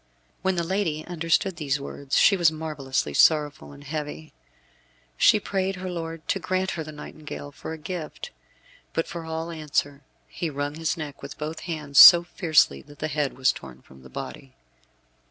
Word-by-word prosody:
When 190 0 +1
the 170 - 0
lady 165 -4 -1
understood 170 +2 0
these 140 -3 -1
words 140 0 -3
she 200 - +6
was 170 -4 +4
marvellously 145 - -3
sorrowful 150 - +3
and 140 0 -13
heavy. 155 +1 -6 0.8
She 215 - +5
prayed 195 -1 -2
her 185 0 -5
lord 165 -2 -6
to 195 - +1
grant 185 +1 -1
her 160 - -4
the 155 - -9
nightingale 150 -1 -9
for 145 - -8
a 160 - -5
gift. 160 0 -6 0.6
But 165 - 0
for 170 -1 -7
all 160 +1 -4
answer 150 -3 -2 0.3
he 170 - -4
wrung 145 0 -3
his 160 +2 -2
neck 150 -3 -7
with 140 - -9
both 155 +1 -5
hands 150 -4 +1
so 175 0 +11
fiercely 155 - +2
that 145 - -16
the 155 - -3
head 145 -3 -2
was 130 -1 +4
torn 65 -2 -12
from 65 0 -17
the 65 - -14
body. 65 +1 -8
155 Hz, 175 wpm, -25 LUFS, 145-170 Hz, 0.8 s, so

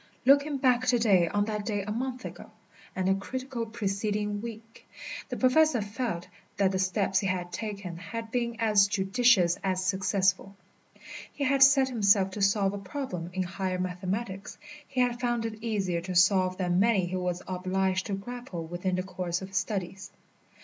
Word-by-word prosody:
Looking 280 +2 +4
back 255 -1 +2
to 250 -1 +4
day 195 -7 +4
on 205 +4 0
that 210 -1 -3
day 205 -2 -2
a 210 - -5
month 255 +3 -3
ago, - - -9 0.5
and 185 0 -1
the 190 - +4
critical 245 +4 -4
preceding 210 -1 -2
week, 225 0 -10 0.4
the - - -4
Professor 265 +1 +4
felt 205 -4 -3 0.3
that 195 -1 +3
the 190 - -1
steps 190 +1 +1
he 195 - -1
had 180 -1 -2
taken 200 -6 -5
had 225 +5 -6
been 235 -1 -1
as 210 -3 +4
judicious 195 -2 +3
as 185 -1 0
successful. 195 0 +1 0.8
He 285 - -4
had 275 0 +2
set 270 -1 +7
himself 200 -5 +3
to 205 - -5
solve 195 0 +2
a 200 - -4
problem 195 - -5
in 185 +1 -1
higher 185 +1 -3
mathematics. 190 +3 -4 0.3
He 260 -2 -1
had 245 -1 +1
found 240 -2 -1
it 220 0 -6
easier 195 -7 -1
to 180 +1 -5
solve 185 0 +4
than 180 -1 +1
many 205 -3 +3
he 180 +1 -4
was 180 -1 -2
obliged 185 +1 -1
to 205 - -3
grapple 200 -4 -6
with 175 +3 -5
in 185 - +2
the 185 - -1
course 180 -2 -3
of 190 - -7
his 190 - -3
studies. 190 0 -3
200 Hz, 180 wpm, -28 LUFS, 185-235 Hz, 0.8 s, set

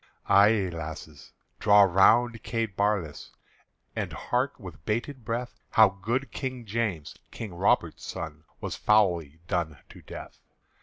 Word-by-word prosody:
Ay, 100 0 +5
lasses, 80 -3 -8 0.3
draw 105 -1 +6
round 115 +5 +4
Kate 115 -3 -3
Barlass, 100 -8 -1 0.7
And - - -3
hark 130 +3 -2
with 90 -7 -11
bated 120 - -3
breath 120 +2 -4
How 110 -2 +6
good 115 +8 -3
King 130 -3 -5
James, 105 -8 -2
King 105 -5 -7
Robert's 85 - +1
son, 80 -2 -6 0.2
Was - - -4
foully 90 -8 +2
done 85 -5 -1
to - - -13
death. - - -10
100 Hz, 130 wpm, -27 LUFS, 85-115 Hz, 0.7 s, draw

